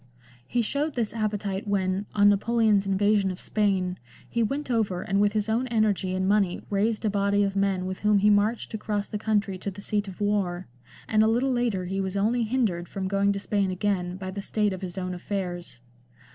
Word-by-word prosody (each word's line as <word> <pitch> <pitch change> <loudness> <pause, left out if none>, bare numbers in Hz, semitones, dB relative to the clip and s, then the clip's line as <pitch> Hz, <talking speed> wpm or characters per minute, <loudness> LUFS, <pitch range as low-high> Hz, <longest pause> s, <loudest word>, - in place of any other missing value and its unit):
He 240 - +1
showed 290 +6 -2
this 230 -4 -1
appetite 210 -2 -2
when, 195 0 0
on 205 -1 +5
Napoleon's 210 0 +3
invasion 200 0 +2
of 185 0 -5
Spain, 190 -4 0 0.3
he 235 - -1
went 275 +4 -1
over 205 -6 0
and 195 +1 +1
with 205 0 +3
his 210 -1 0
own 230 +4 0
energy 210 -5 +1
and 185 0 0
money 200 -3 +1
raised 215 +2 0
a - - +3
body 200 0 +2
of 195 -1 -1
men 195 -2 +1
with 185 0 -4
whom 210 0 +3
he 210 +1 +4
marched 210 +4 +1
across 210 -1 -2
the 210 - -4
country 205 -3 0
to 200 - -3
the 195 0 -9
seat 205 0 -1
of 190 0 -9
war; 195 -3 0 0.4
and 215 -1 +3
a 220 - +5
little 245 +4 +2
later 235 -7 0
he 195 +2 -2
was 190 +1 -2
only 225 +5 +1
hindered 215 -7 0
from 190 -1 -3
going 200 +1 +2
to 200 - -3
Spain 200 -1 0
again 185 -1 -1
by 190 -1 -5
the 200 +1 -5
state 210 0 0
of 185 - -7
his 185 -1 -6
own 185 -1 -3
affairs. 175 -6 -5
200 Hz, 210 wpm, -26 LUFS, 190-215 Hz, 0.4 s, on